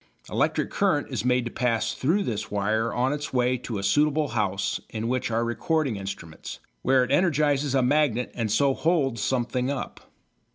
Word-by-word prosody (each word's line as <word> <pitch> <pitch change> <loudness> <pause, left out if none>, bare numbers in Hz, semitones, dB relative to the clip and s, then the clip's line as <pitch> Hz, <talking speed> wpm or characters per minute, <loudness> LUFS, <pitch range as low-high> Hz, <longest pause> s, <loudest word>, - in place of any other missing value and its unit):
Electric - - 0
current 185 -8 +1
is 120 -5 -2
made 125 0 +2
to 120 - -4
pass 115 -2 0
through 175 +10 +1
this 110 - -3
wire 110 +3 0
on 130 +3 +1
its 145 0 -4
way 125 0 +2
to 115 -3 -5
a 100 - -4
suitable 150 +7 +2
house 100 -1 -1
in 110 +1 -4
which 125 0 -1
are 115 +1 0
recording 140 +2 0
instruments, 95 -5 -7 0.2
where 130 0 +4
it - - -3
energises 145 -4 +2
a 130 - +3
magnet 125 -3 +1
and 110 -3 -2
so 135 +5 +3
holds 135 -8 0
something 125 0 0
up. 140 -3 -4
125 Hz, 175 wpm, -26 LUFS, 115-145 Hz, 0.2 s, where